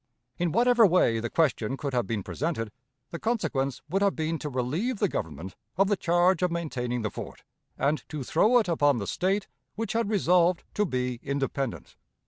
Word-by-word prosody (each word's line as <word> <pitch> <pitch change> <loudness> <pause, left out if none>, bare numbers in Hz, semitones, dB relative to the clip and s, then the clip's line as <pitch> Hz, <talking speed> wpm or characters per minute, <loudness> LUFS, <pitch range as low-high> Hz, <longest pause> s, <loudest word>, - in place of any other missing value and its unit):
In 175 -1 +1
whatever 240 +2 +4
way 170 - +4
the 115 +1 -3
question 135 -5 +1
could 140 -1 -4
have 120 -2 0
been 110 -4 -2
presented, 120 - -3 0.4
the 170 - -5
consequence 150 - -1
would 190 +5 0
have 200 -1 +2
been 160 0 -2
to 150 - -4
relieve 150 - -1
the 205 - +2
Government 85 - -5 0.2
of 195 +1 +3
the 205 - +3
charge 175 0 +2
of 180 - +2
maintaining 125 -8 -2
the 105 - -2
fort, - - -8 0.3
and 145 +3 0
to 150 -3 -4
throw 215 - +4
it 225 - +2
upon 145 -5 +3
the 100 - -3
State 195 - 0 0.3
which 225 +2 -3
had 230 -2 0
resolved 180 -3 +3
to 210 -1 +1
be 125 -3 -2
independent. 140 -2 -3
160 Hz, 185 wpm, -27 LUFS, 125-190 Hz, 0.4 s, whatever